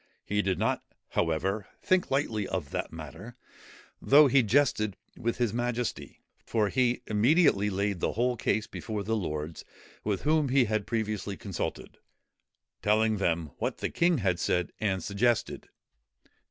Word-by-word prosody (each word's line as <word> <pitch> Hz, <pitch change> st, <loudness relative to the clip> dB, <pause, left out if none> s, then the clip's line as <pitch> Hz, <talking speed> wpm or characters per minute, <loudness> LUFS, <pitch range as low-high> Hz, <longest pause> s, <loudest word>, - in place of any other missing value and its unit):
He 105 Hz, 0 st, +1 dB
did 95 Hz, -3 st, 0 dB
not, -, -, 0 dB, 0.3 s
however, 90 Hz, +5 st, -1 dB, 0.2 s
think 185 Hz, -1 st, +2 dB
lightly 115 Hz, -7 st, 0 dB
of 80 Hz, -7 st, -4 dB
the -, -, -2 dB
matter, 115 Hz, +3 st, -9 dB, 0.7 s
though 150 Hz, +2 st, +7 dB
he 135 Hz, 0 st, +5 dB
jested 110 Hz, -4 st, +2 dB, 0.2 s
with 115 Hz, 0 st, -2 dB
his 120 Hz, -4 st, 0 dB
majesty; 120 Hz, -1 st, -3 dB, 0.2 s
for 110 Hz, -3 st, 0 dB
he 125 Hz, 0 st, +1 dB
immediately 110 Hz, -, +3 dB
laid 100 Hz, -1 st, -1 dB
the -, -, 0 dB
whole 125 Hz, +2 st, +1 dB
case 110 Hz, -1 st, 0 dB
before 110 Hz, -2 st, -5 dB
the 115 Hz, +2 st, 0 dB
lords, 80 Hz, -5 st, -4 dB, 0.4 s
with 100 Hz, -3 st, -1 dB
whom 155 Hz, -2 st, +2 dB
he 130 Hz, -1 st, +4 dB
had 110 Hz, -2 st, -1 dB
previously 110 Hz, -3 st, -2 dB
consulted, 100 Hz, -5 st, -5 dB, 0.8 s
telling 110 Hz, +1 st, +2 dB
them 85 Hz, -5 st, 0 dB
what -, -, -2 dB
the -, -, -3 dB
king 170 Hz, -1 st, +3 dB
had 95 Hz, -6 st, 0 dB
said 90 Hz, 0 st, 0 dB
and 95 Hz, -4 st, 0 dB
suggested. 115 Hz, +5 st, 0 dB
110 Hz, 145 wpm, -29 LUFS, 100-120 Hz, 0.8 s, though